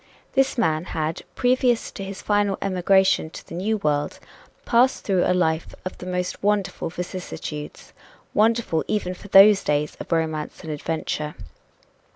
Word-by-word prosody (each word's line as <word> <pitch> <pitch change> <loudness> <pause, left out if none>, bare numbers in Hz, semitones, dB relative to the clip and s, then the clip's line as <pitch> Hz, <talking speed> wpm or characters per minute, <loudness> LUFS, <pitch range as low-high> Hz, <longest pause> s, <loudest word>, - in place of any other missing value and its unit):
This 270 -1 +2
man 160 -7 +1
had, 155 +1 -1
previous 250 -1 +2
to 195 - -7
his 195 0 -7
final 205 -1 +1
emigration 190 -2 +2
to - - -11
the - - -10
New 205 +6 0
World, 150 -6 -1 0.5
passed 250 +2 +3
through 190 -3 +2
a 180 - +2
life 160 -2 0
of 185 - -4
the 180 - -8
most 180 0 -3
wonderful 200 -4 0
vicissitudes 175 -4 -7 0.4
wonderful 220 -6 +2
even 195 -4 -1
for 195 - -12
those 200 +1 +7
days 150 0 0
of - - -8
romance 160 -2 -2
and 160 - -5
adventure. 150 0 -3
185 Hz, 150 wpm, -23 LUFS, 160-205 Hz, 0.5 s, those